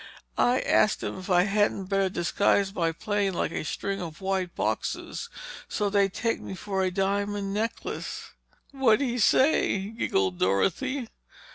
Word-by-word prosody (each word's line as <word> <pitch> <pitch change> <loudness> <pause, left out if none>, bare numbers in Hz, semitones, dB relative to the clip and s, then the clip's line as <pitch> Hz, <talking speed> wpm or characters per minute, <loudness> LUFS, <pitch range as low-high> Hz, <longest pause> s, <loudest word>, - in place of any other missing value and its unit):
I 250 +1 +3
asked 215 - +3
him - - -4
if 185 - -9
I 180 -1 +5
hadn't 205 -1 +1
better 195 0 +1
disguise 195 +2 +1
my 165 -4 +1
plane 200 +2 -1
like - - -1
a - - -3
string 195 +5 -3
of 160 -3 -7
white 190 -2 -2
boxes 470 - -2 0.4
so 205 -2 -1
they'd 200 -1 +3
take 230 -1 -1
me 190 - -6
for 190 +1 -2
a 185 - +2
diamond 200 +1 -1
necklace!" 220 +2 -4 0.4
"What'd 265 -4 +3
he 245 0 -2
say?" 210 -6 +3
giggled 95 - 0
Dorothy. 225 - +1
195 Hz, 150 wpm, -27 LUFS, 185-210 Hz, 0.4 s, I